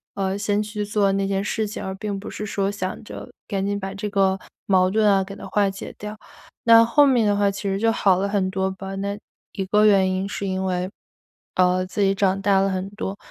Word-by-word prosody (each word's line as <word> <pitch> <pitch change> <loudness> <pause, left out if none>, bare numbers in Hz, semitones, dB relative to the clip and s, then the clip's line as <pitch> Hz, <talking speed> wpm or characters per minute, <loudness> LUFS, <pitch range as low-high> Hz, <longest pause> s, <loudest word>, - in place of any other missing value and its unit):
呃， 195 0 -1
先 205 0 0
去 210 0 -4
做 205 -1 +1
那 195 0 0
件 195 0 0
事 215 +2 -1
情， 210 - -6
而 190 0 -4
并 200 0 -4
不 200 - -8
是 210 - -5
说 200 -1 -1
想 190 -2 -4
着 - - -9 0.2
赶 195 -1 -2
紧 200 0 -1
把 195 0 -5
这 210 +1 -4
个 195 -1 +2 0.3
矛 185 -2 +3
盾 215 +1 +3
啊， 195 -1 +3
给 195 +1 -9
它 - - -9
化 205 -1 +2
解 195 0 -8
掉。 210 +1 -7 0.5
那 230 0 +8
后 285 +6 +5
面 250 -5 +3
的 205 -1 +2
话 200 -1 +3
其 195 0 -5
实 195 -1 -1
就 225 +2 +3
好 195 -4 +3
了 195 +2 0
很 195 -2 0
多 190 0 0
吧， 195 0 -7
那 200 +1 -3 0.4
一 195 - -3
个 210 +3 +3
原 195 -3 +4
因 190 +1 -2
是 200 - -4
因 190 0 -2
为， 180 -1 -1 0.7
呃， 185 0 +3
自 195 - -7
己 195 0 +3
长 195 -1 +1
大 195 -1 +4
了 195 - +2
很 190 0 -2
多， 200 -1 -5
195 Hz, 255 characters per minute, -23 LUFS, 190-205 Hz, 0.7 s, 那